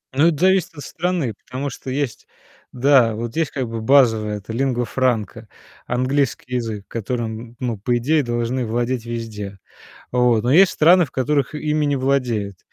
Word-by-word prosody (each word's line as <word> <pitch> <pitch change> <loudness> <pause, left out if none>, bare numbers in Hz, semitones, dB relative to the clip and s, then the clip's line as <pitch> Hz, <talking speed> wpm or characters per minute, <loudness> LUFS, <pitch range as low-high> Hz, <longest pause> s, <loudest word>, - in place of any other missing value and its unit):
Ну 155 +4 +5
это 160 -4 +1
зависит 185 -2 +2
от 145 - -8
страны, 170 -9 -2
потому 140 +3 -4
что 130 - -8
есть 135 -2 -3 0.4
да, 125 -3 +4
вот 115 +3 -5
есть 165 -1 0
как 130 -4 -3
бы 115 -1 -4
базовое- 110 -5 +3
это 105 +2 -9
lingua 125 -1 0
franca, 115 -4 0 0.4
английский 130 0 -1
язык, 110 -5 -3
которым, 115 0 -3
н 120 - -20
ну, 120 -3 -2
по 120 +5 0
идее, 145 +5 +2
должны 120 +1 -1
владеть 120 +1 -2
везде. 110 -4 -6 0.5
Вот. 125 -3 +3
Но 120 +3 +1
есть 185 +4 +6
страны, 175 +3 +5
в - - -18
которых 140 +1 0
ими 150 0 0
не 145 -1 +1
владеют. 125 -8 -1
125 Hz, 170 wpm, -21 LUFS, 115-140 Hz, 0.5 s, есть